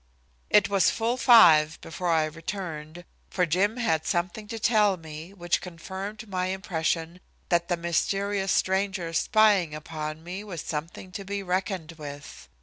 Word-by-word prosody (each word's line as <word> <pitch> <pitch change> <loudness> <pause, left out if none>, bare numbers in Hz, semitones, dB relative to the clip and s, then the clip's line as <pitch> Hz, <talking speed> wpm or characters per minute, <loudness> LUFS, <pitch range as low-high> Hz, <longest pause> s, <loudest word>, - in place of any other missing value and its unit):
It 210 -1 +5
was 195 -1 +3
full 230 +2 0
five 170 - +6
before 175 +2 -4
I 160 -2 +3
returned, 165 0 -6 0.2
for 180 - +1
Jim 195 +8 +1
had 160 -10 +1
something 180 +5 -2
to 225 +1 -5
tell 210 -3 +3
me, 160 +1 -9
which 175 -3 -1
confirmed 190 +5 -7
my 185 -2 -2
impression 170 -3 -2 0.3
that 170 -1 +2
the 175 - 0
mysterious 195 +4 0
stranger's 190 -3 0
spying 205 -8 +3
upon 155 0 -6
me 185 +4 -6
was 180 -7 -6
something 165 +4 -6
to 200 +3 -6
be 200 +1 -4
reckoned 185 -2 -2
with. 145 - -9
180 Hz, 145 wpm, -26 LUFS, 160-200 Hz, 0.3 s, five